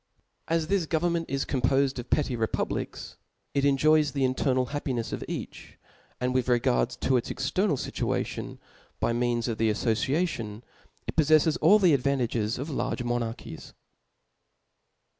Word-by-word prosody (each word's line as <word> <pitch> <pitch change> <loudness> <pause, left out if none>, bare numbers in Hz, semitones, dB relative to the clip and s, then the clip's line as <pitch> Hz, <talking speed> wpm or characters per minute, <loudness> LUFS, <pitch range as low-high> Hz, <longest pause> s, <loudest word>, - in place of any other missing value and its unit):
As 165 -1 +1
this 185 -1 0
government 170 +1 0
is 135 0 -1
compofed 135 +1 +1
of 120 - -7
petty 140 -4 +1
repub 115 -1 -1
lics, - - -5 0.4
it 140 - +1
enjoys 150 +2 +3
the 140 -2 0
internal 130 0 +1
happinefs 130 -6 -2
of - - -4
each; - - -7 0.4
and 125 0 0
with 130 -1 0
regard 60 - +2
to 130 - +3
its 120 - -3
external 145 +5 0
fituation, - - -3 0.4
by 115 - +1
means 120 0 0
of 115 -2 -3
the 110 0 +3
aflbciation, 115 - -1 0.4
it - - -5
poffeileth 155 0 +4
all 190 +7 +7
the 185 -6 +4
advantages 125 -5 0
of 140 +5 -5
large 135 -2 -2
monarchies. 120 -1 -4
135 Hz, 140 wpm, -27 LUFS, 120-155 Hz, 0.4 s, all